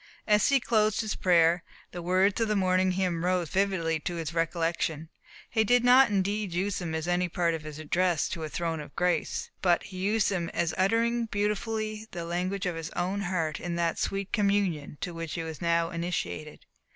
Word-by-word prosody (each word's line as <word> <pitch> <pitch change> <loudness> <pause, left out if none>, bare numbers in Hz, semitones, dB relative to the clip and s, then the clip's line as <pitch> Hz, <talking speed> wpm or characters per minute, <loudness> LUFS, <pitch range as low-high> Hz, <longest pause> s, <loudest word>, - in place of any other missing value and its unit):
As 210 -1 +4
he 275 -1 +4
closed 215 -3 +2
his 215 -2 -2
prayer, 170 -1 +3 0.3
the 175 - -6
words 185 +5 +2
of 225 - +2
the 215 - +1
morning 185 -1 +2
hymn 180 -3 -1
rose 180 -2 +1
vividly 185 -5 0
to 175 +3 -4
his 165 -1 -4
recollection; 165 -1 -1 0.4
he 220 -2 +2
did 245 +3 +3
not 250 +1 +7
indeed 200 -1 -1
use 195 +2 -1
them 165 -3 -3
as 160 +1 -3
any 175 0 +1
part 170 0 +1
of 160 - -3
his 150 -1 -8
address 170 +2 +1
to 170 -4 -4
a 155 - -4
throne 165 0 -2
of 145 -1 -10
grace, 175 -3 0
but 175 -2 +3
he 190 - -9
used 210 +3 +1
them 175 -4 -1
as 170 -1 0
uttering 230 +4 +1
beautifully 215 +1 -2
the 170 -1 -6
language 180 +3 -2
of 180 -2 -1
his 165 -1 -5
own 190 +3 -1
heart 170 -5 -1
in 175 -1 -3
that 170 -1 0
sweet 195 0 -2
communion 200 -9 0
to 175 - -3
which 165 -2 -5
he 165 - -3
was 160 -1 -7
now 170 0 +1
initiated. 170 -3 -4
180 Hz, 200 wpm, -28 LUFS, 165-200 Hz, 0.4 s, not